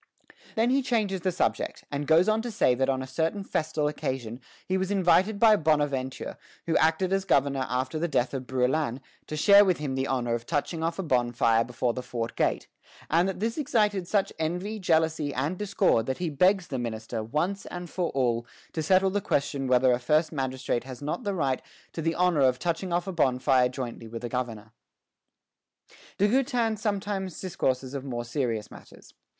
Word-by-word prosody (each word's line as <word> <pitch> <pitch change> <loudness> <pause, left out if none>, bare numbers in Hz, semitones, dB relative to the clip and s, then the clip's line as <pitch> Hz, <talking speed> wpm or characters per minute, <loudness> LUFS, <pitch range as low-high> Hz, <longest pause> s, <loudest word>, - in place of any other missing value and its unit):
Then 230 +2 +2
he 275 +1 +3
changes 215 -7 0
the 185 - 0
subject, 180 - -1
and 145 0 -3
goes 165 +4 +5
on 215 +1 +2
to 240 - -4
say 195 - +2
that 130 +2 0
on 130 -1 0
a - - -5
certain 160 +9 -2
festal 155 -4 -1
occasion 130 -5 -4 0.3
he 185 - 0
was 190 0 0
invited 195 +1 +3
by 220 -1 +7
Bonaventure, 145 -6 -1 0.3
who 165 - 0
acted 165 +4 +2
as 195 0 +1
governor 140 -6 +1
after 130 +4 -1
the 170 - 0
death 130 -4 0
of 130 -2 -4
Brouillan, 130 0 0 0.3
to 155 - -4
share 200 +5 +7
with 185 -4 +2
him 145 -3 -3
the 130 +1 -1
honor 120 -3 -1
of 120 0 -3
touching 160 +2 -2
off 165 +1 -1
a 195 - -2
bonfire 120 -5 +2
before 120 0 -1
the 125 - -4
fort 120 -2 -4
gate; - - 0 0.4
and 170 +4 +3
that 190 - -5
this 225 +7 -1
excited 210 -9 +1
such 200 0 +1
envy, 180 +7 -2
jealousy, 160 -4 +1
and 145 +8 -2
discord 190 - +2
that 130 - -1
he 175 -3 -2
begs 185 +5 +3
the 130 - -3
minister, 110 -1 -4
once 170 - -2 0.2
for 175 0 -2
all, 120 -3 0 0.3
to 160 - -2
settle 190 +4 +3
the 205 +1 0
question 140 -4 -1
whether 125 0 +4
a 120 - +2
first 155 +6 +2
magistrate 130 -4 -2
has 130 +1 -9
not 150 - -3
the 200 -3 -2
right 135 -6 0 0.3
to 165 - -4
the 165 +1 0
honor 180 -4 +2
of 130 -2 +4
touching 175 +5 -2
off 175 0 0
a 190 - -4
bonfire 130 -4 +3
jointly 125 -3 -6
with 115 +1 -7
a 120 - -3
governor. 115 -4 -4 1.5
De 205 - +3
Goutin 240 -2 +1
sometimes 200 -3 -3
discourses 130 -7 -2
of 140 -2 -4
more 120 -3 -4
serious 115 -4 -2
matters. - - -15
150 Hz, 190 wpm, -27 LUFS, 130-190 Hz, 1.5 s, by